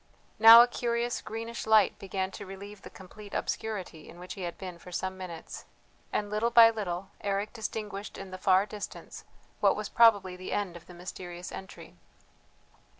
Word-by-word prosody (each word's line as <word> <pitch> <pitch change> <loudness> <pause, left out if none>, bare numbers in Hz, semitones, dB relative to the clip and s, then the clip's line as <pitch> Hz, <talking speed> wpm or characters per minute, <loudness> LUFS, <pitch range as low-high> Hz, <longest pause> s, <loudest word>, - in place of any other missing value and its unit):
Now 225 +2 +11
a - - +1
curious 240 0 -2
greenish 230 +1 -6
light 215 -3 +4
began 190 -1 -3
to 200 - -8
relieve 200 +1 -10
the - - -10
complete 205 +2 -12
obscurity 190 -8 -4
in 170 - -13
which 180 +1 -8
he 195 - -9
had 175 -1 -5
been 180 -3 -8
for 180 - -12
some 190 +1 -3
minutes, 180 -3 -8 0.5
and 205 - -1
little 215 +3 +1
by 230 -1 +8
little 190 -4 -5
Eric 200 +1 -2
distinguished 210 -2 -5
in 195 -1 -9
the 185 - -7
far 190 +1 +4
distance 210 0 -8 0.3
what - - +4
was - - -5
probably 205 -6 +4
the 185 0 -6
end 195 -4 -2
of 170 - -12
the 180 - -12
mysterious 175 0 -8
entry. 190 0 -10
195 Hz, 175 wpm, -29 LUFS, 185-220 Hz, 0.5 s, Now